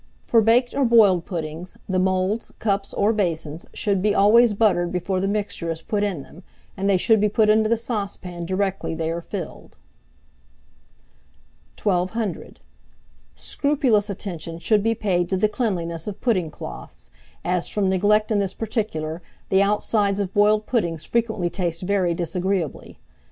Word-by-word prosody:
For 230 - +4
baked 240 +3 +3
or 280 - +1
boiled 210 -8 +5
puddings, 165 0 -6
the 185 -1 0
moulds, 185 +4 0
cups, 200 -2 -1
or 210 +3 +2
basins, 165 -6 -2
should 200 -3 0
be 210 +1 +2
always 220 +2 +5
buttered 185 -5 +2
before 185 +1 -1
the 195 - 0
mixture 200 -4 -2
is 165 0 -4
put 205 +3 -1
in 185 -9 -2
them, 145 +6 -15 0.3
and 195 +1 -1
they 195 - +4
should 220 +3 +3
be 210 - +3
put 215 +1 +3
into 215 0 +3
the 230 - +3
saucepan 195 -6 -5
directly 190 -2 -1
they 160 0 -2
are 170 +1 -3
filled. 180 -1 -7 2.1
1200. 195 +1 -1 0.8
Scrupulous 265 -8 +1
attention 170 -4 -5
should 205 +5 +2
be 225 +2 +1
paid 180 -5 0
to 190 - 0
the 215 - +3
cleanliness 180 -7 -2
of 210 -1 -5
pudding 185 -10 +1
cloths, - - -9 0.3
as, 180 -1 0
from 205 -2 0
neglect 210 +4 +2
in 210 - +2
this 195 -1 -2
particular, 185 -8 -3 0.3
the 190 0 +4
outsides 205 0 +1
of 195 -2 -2
boiled 210 +1 +3
puddings 170 - -1
frequently 220 -6 0
taste 170 -2 -2
very 180 -3 +1
disagreeably. 180 -1 -2
195 Hz, 155 wpm, -23 LUFS, 175-215 Hz, 2.1 s, boiled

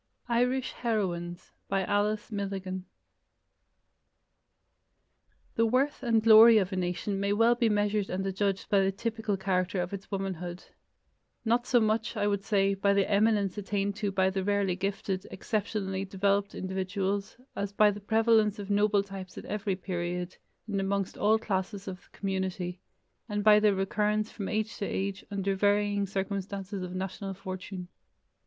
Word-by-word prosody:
IRISH 250 +2 +1
HEROINES 180 -7 -2 0.2
By 195 0 +1
Alice 210 +3 0
Milligan 190 -2 -4 2.7
The 230 0 +2
worth 265 +5 +1
and 230 -3 +2
glory 225 +1 +9
of 195 -2 +1
a - - -1
nation 185 +2 -2
may 200 +1 +1
well 230 +3 +5
be 235 -1 +2
measured 205 -1 +1
and 190 +1 -2
adjudged 195 0 -1
by 200 - +3
the 195 0 +2
typical 220 0 -2
character 185 -1 0
of 180 +2 -3
its 195 -1 -7
womanhood: 180 -3 -4 0.8
not 240 +2 +2
so 245 - +4
much, 220 +1 0
I 205 - +1
would 200 -1 0
say, 200 -1 +2
by 200 +1 +2
the 200 -1 +3
eminence 205 -1 +2
attained 200 0 -1
to 210 -2 -1
by 190 -1 +2
rarely 195 0 0
gifted, 195 0 -3
exceptionally 200 -3 -2
developed 200 +1 0
individuals, 190 +2 -2 0.2
as 200 0 -3
by 210 +1 +5
the 205 +1 -8
prevalence 220 0 +3
of 205 -1 -5
noble 205 0 +3
types 195 -2 -9
at - - -7
every 205 -2 -2
period, 180 -1 -4 0.3
and 200 -2 -1
amongst 195 0 -1
all 215 +2 +3
classes 200 -1 -3
of 185 -1 -6
the - - -19
community, 190 -2 -2 0.5
and 205 0 -1
by 210 0 +7
their 210 -2 +3
recurrence 210 +2 0
from 200 -3 -5
age 215 +1 -1
to 205 - -2
age 195 0 -3
under 195 -1 -1
varying 205 0 +2
circumstances 195 0 -3
of 180 0 -5
national 190 +1 -4
fortune. 185 -1 -7
200 Hz, 155 wpm, -29 LUFS, 190-210 Hz, 2.7 s, glory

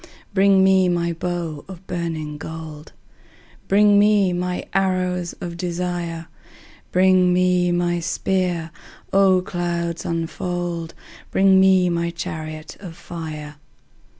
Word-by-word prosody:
Bring 195 -1 +5
me 190 -1 +4
my 170 -1 0
bow 165 -3 -4
of 190 -1 -11
burning 160 -4 -4
gold: 160 -1 -8 0.8
Bring 205 +1 +5
me 205 -3 +4
my 180 0 -2
arrows 185 -2 0
of 170 -1 -7
desire: 175 -1 -3 0.7
Bring 185 0 +4
me 180 0 +2
my 175 0 0
spear: 175 -1 -1 0.4
O 190 -2 +4
clouds 170 -2 -3
unfold! 170 0 -3 0.3
Bring 190 0 +4
me 190 -1 +5
my 170 -1 0
chariot 155 -2 -6
of 180 -5 -9
fire. 155 -3 -7
175 Hz, 110 wpm, -21 LUFS, 170-185 Hz, 0.8 s, Bring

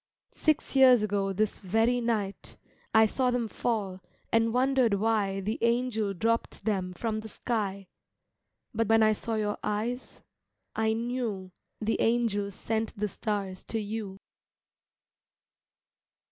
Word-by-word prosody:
Six 310 -3 0
years 255 -4 +7
ago 200 -1 0
this 210 +2 -1
very 225 +5 +2
night 215 -4 -2 0.3
I 220 0 +6
saw 255 +4 +1
them 245 -2 0
fall 205 -5 -2 0.3
and 230 0 +3
wondered 255 -3 +3
why 200 -2 +1
The 215 +4 -2
angel 235 -4 +1
dropped 230 +1 -1
them 190 -4 0
from 215 +3 -2
the 220 0 -8
sky 200 -4 -2 0.9
But 225 -1 0
when 225 0 +5
I 215 0 +5
saw 225 +2 -3
your 210 -1 -1
eyes 230 +5 -3 0.5
I 220 0 +2
knew 225 -5 -3 0.3
The 220 +1 0
angel 225 -4 +1
sent 220 +3 -3
the 210 +1 0
stars 200 -2 -3
to 225 - -2
you. 210 -2 -5
220 Hz, 130 wpm, -29 LUFS, 200-230 Hz, 0.9 s, years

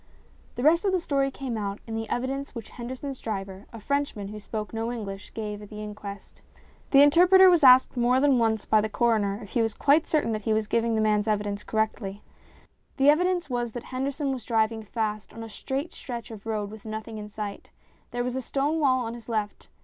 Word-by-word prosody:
The 245 - -3
rest 330 +5 +5
of 390 -2 +1
the 370 - +3
story 275 -4 0
came 265 -3 -5
out 200 -1 -3
in 225 - -7
the 225 0 -3
evidence 270 +3 -3
which 230 -3 -8
Henderson's 255 +3 -6
driver, 195 -2 -5
a 230 - -9
Frenchman 280 -5 -2
who 210 0 -7
spoke 210 +1 -5
no 225 +1 -2
English, 200 -4 -6
gave 210 -2 -4
at 210 - -11
the 210 0 -7
inquest. 205 -1 -9 0.5
The 275 0 +7
interpreter 365 +5 +7
was 345 -4 +3
asked 255 0 +7
more 245 +1 +3
than 275 -2 +4
once 220 -2 +1
by 215 -1 +4
the 215 - -2
coroner 215 -3 +1
if 205 - -12
he 240 - +1
was 225 -2 0
quite 295 +3 +3
certain 300 -7 +1
that 215 -1 -2
he 220 +1 0
was 215 0 +1
giving 230 +2 +1
the 220 - +2
man's 210 0 +2
evidence 210 -1 -1
correctly. 215 -2 -2 0.7
The 275 +1 +6
evidence 355 +1 +1
was 240 -3 -2
that 240 - -6
Henderson 275 +2 -2
was 255 -4 -6
driving 220 -1 +1
fast 215 -1 -3
on 225 - -7
a - - -7
straight 270 +8 -4
stretch 240 -2 -7
of 220 0 -10
road 210 -2 -2
with 220 -1 -11
nothing 220 0 -6
in 210 0 -7
sight. 210 -1 -6 0.4
There 245 0 -2
was 250 0 -3
a 260 - -1
stone 285 +5 -1
wall 260 -4 +2
on 225 - -4
his 235 -1 -11
left. 215 -2 -3
230 Hz, 220 wpm, -26 LUFS, 215-270 Hz, 0.7 s, The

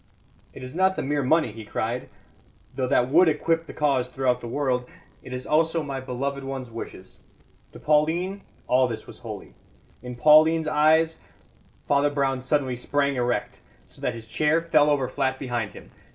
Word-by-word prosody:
"It 130 - -11
is 130 +1 -8
not 190 +1 +3
the - - -3
mere 145 +1 0
money," 155 -1 +2
he 110 +1 -9
cried, 115 +3 -3 0.7
"though 130 -1 -1
that 125 0 +2
would 170 +3 +6
equip 165 +2 0
the - - -7
cause 135 -4 +1
throughout 125 -1 0
the 120 - -6
world. 125 -1 -1 0.3
It - - -11
is 130 0 -5
also 160 +1 +1
my 135 -2 -4
beloved 135 +2 -4
one's 135 -3 -6
wishes. 105 -4 -9 0.5
To - - -11
Pauline 165 +6 +1 0.2
all 130 0 +3
this 115 -2 -6
was - - -12
holy. - - -9 0.5
In 125 0 -7
Pauline's 155 +4 +5
eyes 160 +2 +3 0.4
" - - -33
Father 145 +1 +3
Brown 135 -2 -1
suddenly 130 -1 0
sprang 140 +3 0
erect, 120 -1 -2 0.3
so - - -17
that 125 - -1
his 115 -1 -9
chair 150 +8 +2
fell 155 -3 +3
over 140 -3 +1
flat 130 0 -1
behind 120 -6 -3
him. - - -13
140 Hz, 180 wpm, -25 LUFS, 125-155 Hz, 0.7 s, would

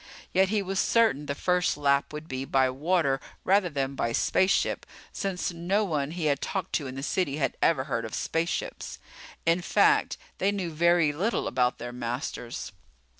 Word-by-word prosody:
Yet 190 +1 +4
he 210 -1 +1
was 195 0 -2
certain 185 - +3
the 140 - -2
first 180 +2 +1
lap 140 -1 +2
would 150 +1 -7
be 130 -2 -4
by 135 -1 +2
water 145 -1 +1 0.2
rather 195 -1 +3
than 140 -3 -2
by 115 -3 -1
spaceship, 185 +10 +2 0.3
since 190 -2 -2
no 180 +5 0
one 150 -6 -1
he 165 0 -4
had 140 -2 +1
talked 190 -3 -3
to 145 - 0
in 130 - -7
the 135 - -5
city 150 -3 0
had 135 -4 0
ever 155 -6 +3
heard 120 -5 -2
of 110 - -5
spaceships. 165 +1 -2 0.5
In 165 +2 +3
fact, - - +3 0.2
they 195 - +2
knew 190 -4 -3
very 170 -1 +3
little 190 +11 -1
about 125 -1 +1
their 120 0 -6
masters. 120 0 -4
155 Hz, 175 wpm, -27 LUFS, 135-180 Hz, 0.5 s, Yet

